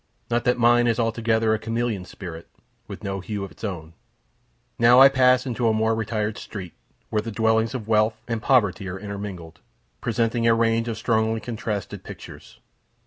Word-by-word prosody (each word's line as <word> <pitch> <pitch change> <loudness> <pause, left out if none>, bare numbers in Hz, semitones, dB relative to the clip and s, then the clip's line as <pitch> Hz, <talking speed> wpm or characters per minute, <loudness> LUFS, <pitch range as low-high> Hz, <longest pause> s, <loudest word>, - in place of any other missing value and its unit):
Not 120 0 +1
that 125 - +2
mine 120 0 +4
is 115 0 +1
altogether 115 -1 +1
a 110 - 0
chameleon 115 -4 -2
spirit, 85 -2 -9 0.4
with 100 +1 -9
no 100 -1 -3
hue 100 +1 -5
of 100 - -7
its - - -18
own. 85 -6 -5 0.9
Now 120 +2 +7
I 135 +1 +10
pass 130 -1 +4
into 120 -2 -1
a 110 - +3
more 110 +1 +2
retired 110 -1 -2
street, 95 -5 -8 0.4
where 105 - +1
the 115 - -6
dwellings 110 +2 +1
of 110 -4 -5
wealth 110 0 +2
and 115 -2 -2
poverty 105 -8 +2
are 90 - -5
intermingled, 95 -4 -7 0.4
presenting 115 0 0
a 115 - +5
range 115 0 +1
of 115 -1 -3
strongly 110 0 +1
contrasted 110 -5 -5
pictures. - - -11
110 Hz, 175 wpm, -24 LUFS, 105-115 Hz, 0.9 s, I